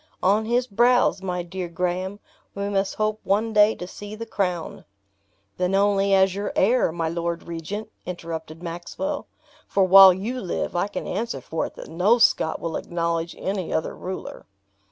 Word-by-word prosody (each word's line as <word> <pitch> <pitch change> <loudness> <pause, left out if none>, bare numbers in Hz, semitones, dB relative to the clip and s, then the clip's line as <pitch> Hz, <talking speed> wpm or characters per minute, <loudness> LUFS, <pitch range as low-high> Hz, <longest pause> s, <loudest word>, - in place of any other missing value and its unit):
On 205 +4 +3
his 240 +2 +1
brows, 240 -1 +3
my 180 -2 -2
dear 180 +1 -5
Graham, 180 +3 -2 0.4
we 200 0 -2
must 195 -1 0
hope 215 0 -1
one 215 +3 +1
day 210 +1 +5
to 180 - -7
see 205 +3 -9
the 230 +1 -6
crown." 185 -5 -3 0.7
"Then 180 +1 +1
only 200 0 +3
as 190 -1 +4
your 200 +1 -3
heir, 230 -1 +3
my 165 0 -2
lord 170 +1 -3
regent," 185 +6 -5
interrupted 165 -2 -6
Maxwell; 175 - -4 0.4
"for 195 - +2
while 190 +1 +9
you 220 +8 -3
live, 180 - -3
I 175 +3 +1
can - - -5
answer 230 +5 -3
for 160 - -3
it - - -15
that - - -9
no 185 +8 +3
Scot 160 -8 +3
will 165 -1 -3
acknowledge 170 -1 -2
any 190 -2 -3
other 160 - -1
ruler." 185 +1 -7
190 Hz, 170 wpm, -24 LUFS, 175-210 Hz, 0.7 s, while